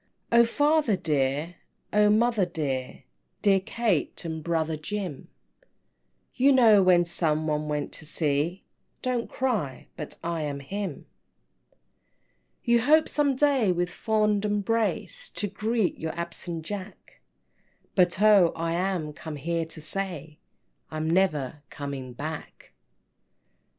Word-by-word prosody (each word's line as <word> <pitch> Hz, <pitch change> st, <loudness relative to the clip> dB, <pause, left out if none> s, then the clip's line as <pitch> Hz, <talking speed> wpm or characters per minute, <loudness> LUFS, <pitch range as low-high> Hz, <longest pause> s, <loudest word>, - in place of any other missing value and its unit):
III. 235 Hz, -, +7 dB
"O -, -, +5 dB
father 290 Hz, -3 st, +2 dB
dear, 150 Hz, +1 st, -1 dB, 0.4 s
O 210 Hz, 0 st, +5 dB
mother 225 Hz, 0 st, +3 dB
dear, 140 Hz, -6 st, -3 dB, 0.4 s
Dear 195 Hz, -2 st, +5 dB
Kate, 205 Hz, -5 st, -1 dB
and 160 Hz, -1 st, -4 dB
brother 160 Hz, -1 st, 0 dB
Jim 170 Hz, -2 st, -5 dB, 1.1 s
You 270 Hz, +2 st, +4 dB
know 225 Hz, -6 st, +6 dB
when 180 Hz, -2 st, +5 dB
some 160 Hz, -2 st, 0 dB
one 150 Hz, -1 st, -1 dB
went 150 Hz, -1 st, -2 dB
to 160 Hz, -, -6 dB
sea 155 Hz, +3 st, 0 dB, 0.4 s
Don't 250 Hz, -2 st, -1 dB
cry 210 Hz, -, -2 dB
but 150 Hz, -, -7 dB
I 170 Hz, -1 st, -2 dB
am 145 Hz, -2 st, -3 dB
him!" 195 Hz, +6 st, -4 dB
IV. 140 Hz, -, -13 dB, 1.6 s
"You 235 Hz, 0 st, +3 dB
hope 310 Hz, +6 st, +5 dB
some 285 Hz, -2 st, +1 dB
day 265 Hz, -7 st, +3 dB
with 175 Hz, 0 st, -1 dB
fond 210 Hz, +1 st, +1 dB
embrace 225 Hz, -, -1 dB
To -, -, -3 dB
greet 215 Hz, +1 st, -1 dB
your 160 Hz, 0 st, -3 dB
absent 170 Hz, -1 st, -4 dB
Jack, 205 Hz, +2 st, -8 dB, 0.7 s
But 180 Hz, -1 st, +3 dB
oh, 200 Hz, -5 st, +6 dB
I 165 Hz, 0 st, -2 dB
am 175 Hz, -4 st, -1 dB
come 155 Hz, 0 st, -7 dB
here 165 Hz, +3 st, -2 dB
to 160 Hz, -1 st, -10 dB
say 160 Hz, -3 st, -4 dB, 0.5 s
I'm 155 Hz, 0 st, -3 dB
never 155 Hz, -6 st, +1 dB
coming 140 Hz, -3 st, -6 dB
back!" 155 Hz, +5 st, -7 dB
175 Hz, 130 wpm, -27 LUFS, 155-210 Hz, 1.6 s, III